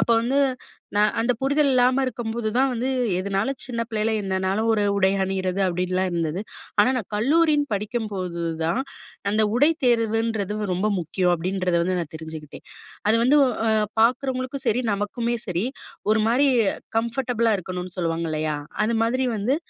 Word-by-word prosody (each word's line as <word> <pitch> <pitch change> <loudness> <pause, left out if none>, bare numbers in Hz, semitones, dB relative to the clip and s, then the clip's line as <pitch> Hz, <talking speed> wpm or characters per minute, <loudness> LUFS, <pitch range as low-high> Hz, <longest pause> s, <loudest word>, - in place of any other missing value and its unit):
அப்போ 235 - +2
வந்து 260 +4 +1 0.6
நான் 210 +1 +3
அந்த 235 +2 +2
புரிதல் 285 +2 +3
இல்லாம 255 +1 +3
இருக்கும்போது 230 -2 -3
தான் 265 +1 +3
வந்து, 245 +2 -2 0.3
எதுனாலும் 200 +8 -1
சின்ன 240 -3 -3
பிள்ளையில 220 0 0
என்னனாலும் 190 +3 0
ஒரு 215 -2 +2
உடை 190 -1 +3
அணியிறது, 190 0 -2
அப்பிடின்லாம் 185 +1 0
இருந்தது. 165 +1 -1 0.4
ஆனா, 205 +5 +6
நான் 230 -6 -4
கல்லூரின்னு 295 +4 +2
படிக்கும்போது 200 -5 -3 0.2
தான், 230 +11 +1 0.5
அந்த 215 +1 +2
"உடை 290 +5 +5 0.2
தேர்வுன்றது 225 -3 0
ரொம்ப 185 +4 0
முக்கியம்." 180 +2 0
அப்பிடின்றத 185 +1 -1
வந்து 185 0 0
நான் 165 -3 -6
தெரிஞ்சுக்கிட்டேன். 160 -2 -9 0.4
அது 220 - +4
வந்து 285 +4 +5 0.3
அ - - +3 0.3
பார்க்குறவங்களுக்கும் 255 +2 0
சரி, 245 +4 +1
நமக்குமே 230 +4 -2
சரி, 180 +2 -1 0.5
ஒரு 215 0 +3
மாரி 265 +5 +3 0.5
கம்ஃபர்டபுளா 235 -1 0
இருக்கணும்ன்னு 180 0 -6
சொல்லுவாங்க. 165 -1 -1
இல்லயா! 155 -1 -1 0.3
அது 230 +1 0
மாதிரி 255 +3 0
வந்து 245 +8 +1
215 Hz, 145 wpm, -24 LUFS, 185-245 Hz, 0.6 s, ஆனா